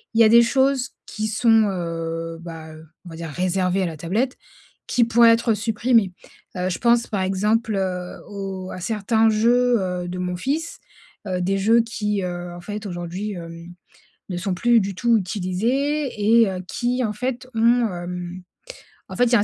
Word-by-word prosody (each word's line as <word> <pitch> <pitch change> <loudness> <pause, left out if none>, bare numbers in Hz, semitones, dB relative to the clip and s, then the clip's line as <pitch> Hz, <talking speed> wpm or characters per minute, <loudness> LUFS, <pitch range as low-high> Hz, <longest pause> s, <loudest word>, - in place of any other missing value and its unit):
y 230 - +7
a 215 - +6
des 235 +1 +7
choses 265 +1 +1 0.2
qui 215 +1 -3
sont 225 0 +4
heu, 165 -2 -4
bah, 160 -2 -9
heu, 155 +1 -13 0.2
on - - -9
va 165 - -9
dire, 165 -1 -6
réservées 185 +3 0
à - - +1
la 160 -2 -6
tablette 215 - -1 0.5
qui 240 - +3
pourraient 230 0 +6
être 230 0 +2
supprimées. 220 -2 +1 0.4
Heu, 180 +1 -1
je 180 - -2
pense 235 0 +3
par 200 -3 -2
exemple 210 +4 0
heu, 180 -2 -3
au 195 -2 -6
à 185 - -7
certains 220 +2 +2
jeux, 240 +2 +3
heu, 180 -1 -3
de 180 0 -5
mon 180 0 -2
fils, 305 - -2 0.5
heu, 180 -1 -1
des 195 +2 0
jeux 225 +4 +4
qui, 210 -3 -2
heu, 175 -1 -5
en 175 - -9
fait 210 +2 -6
aujourd'hui, 180 +3 -4
hem, 170 0 -9 0.6
ne 180 - -3
sont 180 +1 -2
plus 235 +5 +4
du 195 0 -3
tout 235 +2 +3
utilisés 235 +10 -1 0.3
et 215 - +4
heu, 185 -1 -4
qui 250 +1 -1
en 210 -2 -1
fait, 250 +2 -4
ont, 235 +1 +4
hem, 180 +1 -6 0.7
en - - -7
fait, 245 - +4
il 240 - 0
y - - +8
a - - +5
un - - +3
200 Hz, 190 wpm, -22 LUFS, 180-230 Hz, 0.7 s, y